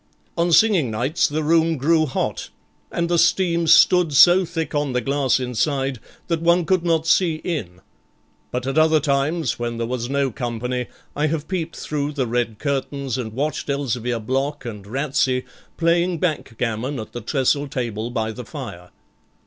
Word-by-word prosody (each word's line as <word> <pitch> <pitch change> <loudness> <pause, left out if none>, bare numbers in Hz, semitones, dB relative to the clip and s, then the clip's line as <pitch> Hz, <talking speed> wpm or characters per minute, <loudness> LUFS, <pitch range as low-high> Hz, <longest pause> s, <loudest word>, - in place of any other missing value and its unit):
On 170 0 +1
singing 180 - +4
nights 125 +9 +1
the 155 0 -2
room 165 +1 +3
grew 155 +3 +2
hot, 130 - -3 0.4
and 170 0 -1
the 170 0 +2
steam 170 -1 +2
stood 170 0 +5
so 175 +6 +7
thick 165 -1 -4
on 145 -3 -1
the 125 - +2
glass 135 0 +1
inside 135 +1 -1 0.3
that 165 -2 -1
one 170 +1 +3
could 185 0 +1
not 165 -2 +1
see 165 -1 +3
in; 95 - -4 0.7
but 125 0 -3
at 135 +3 +1
other 155 0 +4
times, 150 +3 0
when 120 -1 -3
there 115 - -1
was 120 0 -3
no 140 -1 0
company, 125 +1 -3 0.3
I 150 +2 +1
have 155 -1 -3
peeped 170 -3 -3
through 150 0 -3
the 135 -3 -1
red 120 -2 -1
curtains 140 -1 -2
and 110 -3 -5
watched 145 +4 -2
Elzevir 125 -4 -1
Block 135 +5 -2
and 105 -4 -7
Ratsey 130 0 0 0.3
playing 170 +1 +2
backgammon 125 -5 -2
at 110 - -7
the 120 - -6
trestle 140 +4 0
table 120 -5 -3
by 110 -2 -2
the 125 +3 -7
fire. 115 - -8
140 Hz, 165 wpm, -22 LUFS, 125-165 Hz, 0.7 s, so